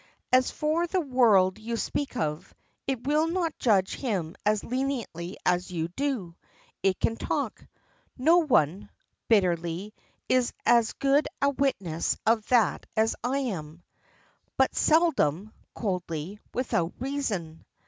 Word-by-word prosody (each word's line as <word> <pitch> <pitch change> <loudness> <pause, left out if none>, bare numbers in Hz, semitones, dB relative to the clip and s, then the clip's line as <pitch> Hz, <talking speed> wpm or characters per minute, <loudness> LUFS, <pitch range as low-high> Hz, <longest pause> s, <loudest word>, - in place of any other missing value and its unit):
"As 255 0 +5
for 320 +3 0
the 375 +2 0
world 225 - +3
you 230 +2 -3
speak 275 +2 -3
of 155 -3 -3 0.3
it 260 -3 -2
will 300 +3 +2
not 335 -2 -2
judge 195 -6 +2
him 190 - -3
as 210 -1 +2
leniently 245 -9 -3
as 180 +1 +1
you 165 -2 -3
do. 225 -6 -3 0.5
It 190 -1 +1
can 225 - +1
talk. - - -3 0.5
No 320 +7 +5
one," 205 - +1 0.4
bitterly, 180 -1 +1 0.3
"is 255 -1 +2
as 235 -2 +4
good 280 +2 +2
a 280 0 +3
witness 195 - -1
of 220 -1 +2
that 240 -5 +2
as 220 +1 +2
I 255 +3 0 0.2
am." 155 0 -8 0.7
"But - - +3
seldom," 225 - +2 0.2
coldly, 180 -2 -3
"without 180 -9 -1
reason." 215 - -3
220 Hz, 130 wpm, -27 LUFS, 180-270 Hz, 0.7 s, As